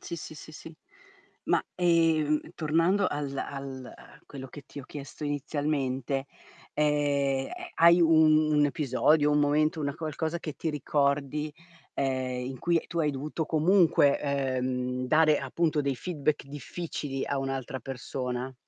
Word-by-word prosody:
Sì, 170 - -6
sì, 155 - -8
sì, 155 +1 -11
sì. 160 +1 -11 0.7
Ma, - - +2
ehm, 165 -4 +3
tornando 165 +5 +2
al 145 -1 -3
al 135 -2 -5
a - - -16
quello 135 -2 -9
che 145 +3 -11
ti 140 - -9
ho - - -12
chiesto 145 +2 -8
inizialmente, 140 -2 -2 0.5
ehm, 145 -2 +1
eh, - - -10 0.3
hai 170 +1 +6
un 155 -2 +5
episodio, 150 +1 +2
un 150 0 +3
momento, 155 +2 +2
una 140 -1 -2
qualcosa 160 +1 -3
che 160 -2 -5
ti 165 - -3
ricordi, 145 +1 0 0.4
ehm, 130 -2 -1
in 130 -1 -6
cui 170 -1 +1
tu 170 - -4
hai 150 -3 +2
dovuto 150 +3 -4
comunque, 160 -3 +4 0.4
uhm, 125 0 -2
dare 155 +1 +4
appunto 155 +3 0
dei 140 -2 -1
feedback 155 -2 -2
difficili 145 0 -5
a 140 - -2
un'altra 135 -1 -3
persona? 125 0 -4
145 Hz, 140 wpm, -28 LUFS, 135-155 Hz, 0.7 s, hai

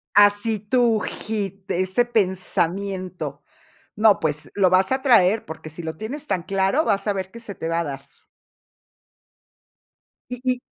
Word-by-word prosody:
Así 205 +1 +4
tú, 230 +1 +2
hit, 200 -3 -4
ese 185 +7 +1
pensamiento. 185 - -1 0.5
No, 215 -1 +5
pues, 150 -1 -2
lo 195 -2 +4
vas 185 +5 +3
a 265 0 +1
traer, 220 -5 +4
porque 160 0 -8
si 160 +3 -8
lo 160 0 -4
tienes 280 - -6
tan 185 -3 0
claro, 195 +10 +1
vas 200 -4 0
a 205 - +2
ver 190 -1 -4
qué 235 - -10
se 225 -4 -7
te 165 - -5
va 165 0 0
a - - 0
dar. 140 -3 -5 2.3
Y 250 - -3
y 255 -1 0
195 Hz, 155 wpm, -23 LUFS, 180-220 Hz, 2.3 s, No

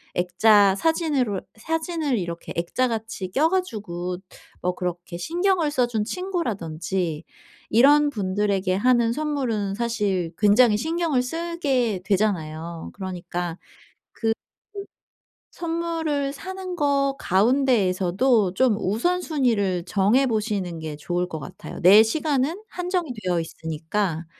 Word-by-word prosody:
액자 195 +3 +4
사진으로 280 - 0 0.2
사진을 320 +1 -1
이렇게 170 -2 -5
액자같이 220 +1 -2
껴 300 +8 +3
가지고 205 - -3 0.4
뭐 180 0 -1
그렇게 175 -1 -4
신경을 340 - +1
써 250 -4 +2
준 220 -3 -1
친구라든지 190 - -3 0.5
이런 290 +6 +5
분들에게 195 -3 0
하는 235 +2 +3
선물은 250 -9 -1
사실 205 -7 -1
굉장히 210 +2 +5
신경을 320 0 0
쓰게 270 - -1
되잖아요. 170 -5 -1
그러니까 175 -2 -5
그 - - -25 1.8
그 - - -20
선물을 325 -4 -1
사는 375 +2 -6
것 280 -3 +1
가운데에서도 205 -2 +2
좀 250 -1 +3
우선순위를 225 - 0
정해 210 +9 +3
보시는 205 -7 -2
게 155 -2 -5
좋을 175 +4 -2
것 160 - -5
같아요. - - -9
내 195 +5 +8
시간은 290 - 0
한정이 360 -5 -2
되어 180 -2 0
있으니까 160 +2 -3
220 Hz, 265 characters per minute, -24 LUFS, 180-290 Hz, 1.8 s, 내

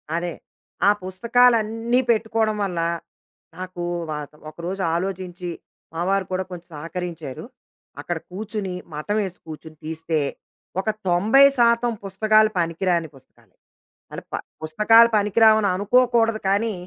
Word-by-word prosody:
అదే. 170 -1 -2 0.5
ఆ - - +8
పుస్తకాలన్నీ 230 +3 +2
పెట్టుకోవడం 220 -1 0
వల్ల, 180 -4 -2 0.8
నాకు 185 -1 -7 0.3
వ - - -2 0.4
ఒకరోజు 175 +5 -5
ఆలోచించి 180 -1 -4 0.4
మావారు 185 +3 0
కూడా 185 0 -1
కొంచెం 175 -1 -9
సహకరించారు. 165 -3 -6 0.6
అక్కడ 175 +3 -3
కూర్చొని 205 -1 -4 0.2
మఠమేసుకు 190 +4 -3
కూర్చొని 155 0 -10
తీస్తే, 160 0 -2 0.6
ఒక 205 +3 -1 0.2
90 215 +11 +5
శాతం 235 0 +3
పుస్తకాలు 215 +2 +3
పనికిరాని 170 -1 0
పుస్తకాలు. 130 0 -23 0.6
అంటే - - -7
ప - - +1 0.3
పుస్తకాలు 220 +9 +5
పనికిరావు 215 +2 +5
అని 200 - +2
అనుకోకూడదు 225 +2 +2
కానీ 215 +2 +1
195 Hz, 110 wpm, -22 LUFS, 175-220 Hz, 0.8 s, ఆ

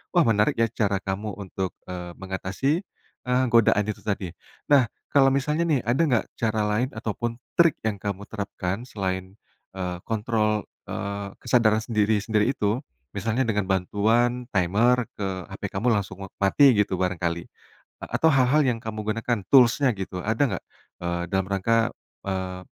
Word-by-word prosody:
Wah 175 - +6
menarik 105 -1 +3
ya 115 - +3
cara 100 -4 0
kamu 100 +2 -3
untuk, 95 -1 -4 0.2
eee, 90 -1 -6
mengatasi, 95 +6 -2 0.6
eee, 125 +1 +3
godaan 110 -2 +5
itu - - -10
tadi. 100 -3 -2 0.4
Nah, 135 -4 +7 0.3
kalau 140 -1 +5
misalnya 150 +4 +1
nih 150 -5 +3
ada 125 +6 +2
nggak, 125 -5 +2
cara 110 -1 0
lain 120 +5 +1
ataupun 115 +1 -3 0.2
trik 170 -3 +6
yang 105 - 0
kamu 100 -1 -4
terapkan, 100 0 -4
selain, 95 -1 -4 0.4
eee, 90 -1 -3
kontrol, 110 -1 0 0.2
eee, 100 0 -4
kesadaran 115 -3 +3
sendiri-sendiri 110 +1 +1
itu? 105 +4 0 0.3
Misalnya 110 +6 0
dengan 105 -2 +1
bantuan 115 +6 +1
timer 110 +7 +3
ke 100 - -3 0.2
HP - - -10 0.2
kamu 115 +6 0
langsung 100 -3 -3 0.2
mati 100 +9 +5
gitu 105 -3 +1
barangkali, 85 -2 -1 0.5
atau 160 - +1
hal-hal 135 +2 +4
yang 125 -4 +1
kamu 110 -1 -6
gunakan, 115 +2 -1
tools-nya 130 +1 +6
gitu, 90 -1 -4
ada 110 +3 -1
nggak, - - -8 0.4
eee, 85 0 -1
dalam 95 -1 +2
rangka, 115 +4 +2 0.3
eee, 95 -1 -3
105 Hz, 150 wpm, -25 LUFS, 95-120 Hz, 0.6 s, Nah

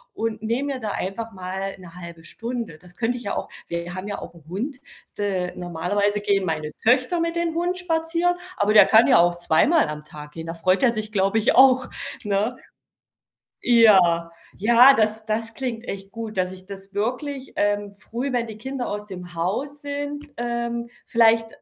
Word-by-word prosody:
und 225 -1 -3
nehme 250 +6 -1
mir 260 - -5
da 220 -3 -4
einfach 225 +4 -4
mal 190 +1 -5
'ne 180 -3 -13
1/2 170 -1 -10
Stunde. 230 -2 -5
Das 180 +1 -15
könnte 245 +1 0
ich 240 - -9
ja 200 - -2
auch. - - -3 0.2
Wir 170 +1 -4
haben 185 +2 -6
ja 205 - -3
auch - - -9
'n 170 -2 -17
Hund, 250 +9 -4 0.4
äh, 190 -3 -1
normalerweise 180 +4 -1
gehen 200 -2 +1
meine 155 -2 -2
Töchter 255 +8 +3
mit 335 0 -1
den 340 -1 0
Hund 350 +2 -1
spazieren, 340 0 0 0.2
aber 210 +1 +2
der 215 - +8
kann 220 +1 +7
ja - - +6
auch 175 0 +4
zweimal 175 - +3
am 150 0 -6
Tag 150 -1 -11
gehen. 165 +1 -8
Da 165 - -5
freut 185 +3 +2
er 255 -3 +5
sich, 215 -1 -4
glaube 195 +1 +1
ich, 220 - +3
auch, 260 -1 +6 0.3
ne? 210 +3 0 1.1
Ja. 190 -8 +5 0.3
Ja, 235 +6 +7
das 215 -2 +1
das 225 +1 -2
klingt 245 -2 -4
echt 195 0 -6
gut, 225 -1 -6
dass 185 0 0
ich 185 0 -11
das 195 0 -10
wirklich, 255 +6 -3
ähm, 205 0 0
früh, 240 +6 -5
wenn 240 -1 0
die 220 -1 -8
Kinder 265 +2 -4
aus 210 0 -4
dem 180 -3 -8
Haus 220 - -2
sind 290 0 -4
ähm, 235 0 -2 0.2
vielleicht 230 -1 +4
215 Hz, 190 wpm, -23 LUFS, 185-245 Hz, 1.1 s, der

